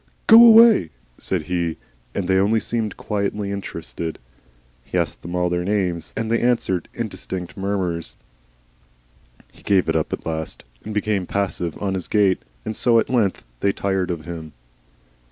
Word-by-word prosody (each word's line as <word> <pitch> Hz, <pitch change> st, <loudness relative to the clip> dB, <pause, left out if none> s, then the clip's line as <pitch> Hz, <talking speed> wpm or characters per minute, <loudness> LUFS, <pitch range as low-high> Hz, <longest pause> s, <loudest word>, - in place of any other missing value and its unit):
"Go 230 Hz, +1 st, +9 dB
away," 225 Hz, -, +8 dB, 0.3 s
said 90 Hz, -4 st, -2 dB
he, 85 Hz, -1 st, -2 dB, 0.4 s
and 95 Hz, -, -2 dB
they 95 Hz, 0 st, +3 dB
only 105 Hz, +3 st, +3 dB
seemed 110 Hz, -1 st, -3 dB
quietly 100 Hz, -1 st, -2 dB
interested. 85 Hz, -4 st, -5 dB, 0.7 s
He -, -, -4 dB
asked -, -, -1 dB
them 85 Hz, +1 st, -6 dB
all 90 Hz, 0 st, +1 dB
their 90 Hz, 0 st, -1 dB
names 90 Hz, -4 st, -1 dB
then, 115 Hz, -, -2 dB
and 110 Hz, -, -4 dB
they 115 Hz, -, +2 dB
answered 120 Hz, -7 st, 0 dB
indistinct 90 Hz, -2 st, -5 dB
murmurs. 95 Hz, -4 st, -3 dB, 1.3 s
He -, -, -20 dB
gave 95 Hz, -3 st, +2 dB
it -, -, 0 dB
up -, -, 0 dB
at -, -, -5 dB
last 80 Hz, -1 st, -4 dB, 0.2 s
and 110 Hz, -, -6 dB
became 105 Hz, -3 st, -1 dB
passive 90 Hz, -4 st, -2 dB
on 100 Hz, -2 st, -1 dB
his 95 Hz, -2 st, -4 dB
gate, 100 Hz, -4 st, +2 dB, 0.2 s
and 110 Hz, -, -3 dB
so 120 Hz, +1 st, +3 dB
at 115 Hz, -, +1 dB
length 110 Hz, -7 st, +1 dB, 0.2 s
they 100 Hz, -, +2 dB
tired 95 Hz, -2 st, -1 dB
of 85 Hz, -3 st, -4 dB
him. 80 Hz, -3 st, -7 dB
95 Hz, 165 wpm, -22 LUFS, 90-105 Hz, 1.3 s, Go